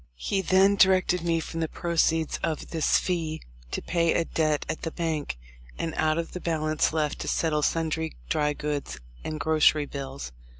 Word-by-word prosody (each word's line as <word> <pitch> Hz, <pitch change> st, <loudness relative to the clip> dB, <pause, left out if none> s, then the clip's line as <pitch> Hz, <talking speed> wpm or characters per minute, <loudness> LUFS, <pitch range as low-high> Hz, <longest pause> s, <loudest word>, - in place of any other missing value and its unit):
He 195 Hz, -, -1 dB
then 190 Hz, +2 st, +4 dB
directed 185 Hz, -2 st, +4 dB
me 165 Hz, -1 st, +1 dB
from 165 Hz, 0 st, -5 dB
the 160 Hz, -, 0 dB
proceeds 165 Hz, -1 st, 0 dB
of 160 Hz, -3 st, -3 dB
this 160 Hz, -2 st, +3 dB
fee 160 Hz, -3 st, -1 dB, 0.3 s
to -, -, -4 dB
pay 170 Hz, -1 st, +1 dB
a 170 Hz, -, +2 dB
debt 155 Hz, -3 st, 0 dB
at -, -, -3 dB
the 165 Hz, -, -2 dB
bank, 160 Hz, -, -2 dB, 0.4 s
and 160 Hz, -, -3 dB
out 155 Hz, 0 st, +2 dB
of 170 Hz, 0 st, -3 dB
the 180 Hz, -, -6 dB
balance 155 Hz, -2 st, +1 dB
left 155 Hz, -2 st, -1 dB
to -, -, -5 dB
settle 155 Hz, -2 st, +1 dB
sundry 160 Hz, 0 st, 0 dB
dry 150 Hz, -2 st, +1 dB
goods 145 Hz, -, -4 dB, 0.2 s
and 155 Hz, -1 st, -4 dB
grocery 155 Hz, -1 st, +4 dB
bills. 135 Hz, -, -6 dB
160 Hz, 175 wpm, -27 LUFS, 150-170 Hz, 0.4 s, then